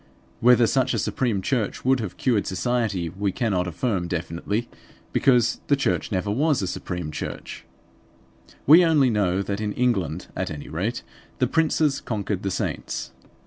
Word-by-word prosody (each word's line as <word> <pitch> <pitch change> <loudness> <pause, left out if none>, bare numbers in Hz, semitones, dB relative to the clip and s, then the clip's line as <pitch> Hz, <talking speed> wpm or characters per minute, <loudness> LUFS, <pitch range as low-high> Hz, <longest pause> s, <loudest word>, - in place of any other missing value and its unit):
Whether 120 0 +6
such 130 +1 +1
a - - 0
supreme 110 -2 -1
church 120 -3 -1
would 130 0 +3
have 105 -6 -5
cured 115 -6 +1
society 105 -3 -1
we 100 +3 -2
cannot 95 -5 0
affirm 90 +1 -1
definitely; 90 +6 -3 0.5
because 120 -3 +3
the 140 - +4
church 135 - -1
never 100 +1 -1
was 145 +5 +2
a - - -1
supreme 90 -3 -4
church. - - -6 1.0
We 165 +5 +8
only 150 -7 +4
know 100 -3 +1
that 100 +1 -3
in 105 -1 -2
England 95 - 0
at - - -2
any 75 -2 -7
rate 100 +10 -2 0.3
the - - +2
princes 155 -3 +1
conquered 105 -3 -3
the 100 - -2
saints. - - -3
105 Hz, 155 wpm, -24 LUFS, 95-125 Hz, 1.0 s, We